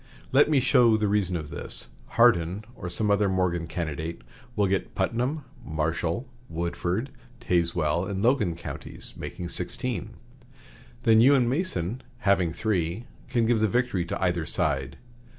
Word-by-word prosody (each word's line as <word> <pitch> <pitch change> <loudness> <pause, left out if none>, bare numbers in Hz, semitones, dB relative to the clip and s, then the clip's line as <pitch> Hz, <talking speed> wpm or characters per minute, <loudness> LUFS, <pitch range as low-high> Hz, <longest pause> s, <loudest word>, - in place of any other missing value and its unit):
Let 140 +3 +5
me 150 -3 +4
show 120 -3 +5
the 105 -1 +1
reason 100 -3 +1
of 75 -2 -7
this. - - -4 0.3
Hardin, 105 -4 +4
or 90 - -6
some 105 +2 0
other 100 -1 +3
Morgan 90 -3 0
candidate, 80 0 -4 0.3
will 105 - +3
get 95 0 -1
Putnam, 125 +10 0 0.2
Marshall, 80 - -1 0.2
Woodford, 85 +8 -2 0.3
Tazewell, 85 0 +1
and 100 0 -2
Logan 115 -9 +2
[counties], 85 - -7
making 85 0 -6
sixteen. 120 +2 -3 0.9
Then 110 -1 +6
you 135 +4 +7
and 125 -3 +3
Mason, 125 - -1 0.2
having 95 -5 +3
three, 95 +1 -1 0.2
can 115 -2 +2
give 115 -1 +3
the 110 - +3
victory 120 -4 +1
to - - -4
either 90 -3 +1
side. 70 -3 0
95 Hz, 145 wpm, -27 LUFS, 85-115 Hz, 0.9 s, you